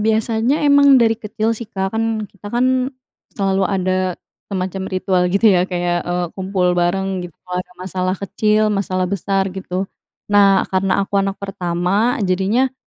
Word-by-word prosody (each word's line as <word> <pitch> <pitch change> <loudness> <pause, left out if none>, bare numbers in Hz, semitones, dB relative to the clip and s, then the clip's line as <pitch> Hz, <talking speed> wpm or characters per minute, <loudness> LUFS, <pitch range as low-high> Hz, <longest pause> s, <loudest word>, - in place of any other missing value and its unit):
biasanya 225 +6 +1
emang 285 -1 +6
dari 230 -2 +4
kecil 220 +1 -1
sih, 230 -1 -7
Kak. 190 -3 -3
Kan, 225 -1 -1
kita 205 +1 -11
kan, 255 +2 +1 0.5
selalu 195 -1 +1
ada 185 -1 0 0.3
semacam 190 -1 -3
ritual 185 -1 0
gitu, 200 +5 +2
ya, 180 0 +2
kayak, 175 -1 -1
eee, 175 0 -2
kumpul 185 -2 0
bareng, 185 +2 0
gitu, 165 - -24
kalau 180 0 -3
ada 180 - -11
masalah 185 0 -2
kecil, 215 +2 +1
masalah 185 -2 -1
besar, 195 +1 -1
gitu. 190 0 -3 0.5
Nah, 200 -1 +5
karena 190 +1 +1
aku 200 0 0
anak 195 0 -2
pertama, 195 +4 -1
jadinya 200 +8 +1
195 Hz, 155 wpm, -19 LUFS, 185-215 Hz, 0.5 s, emang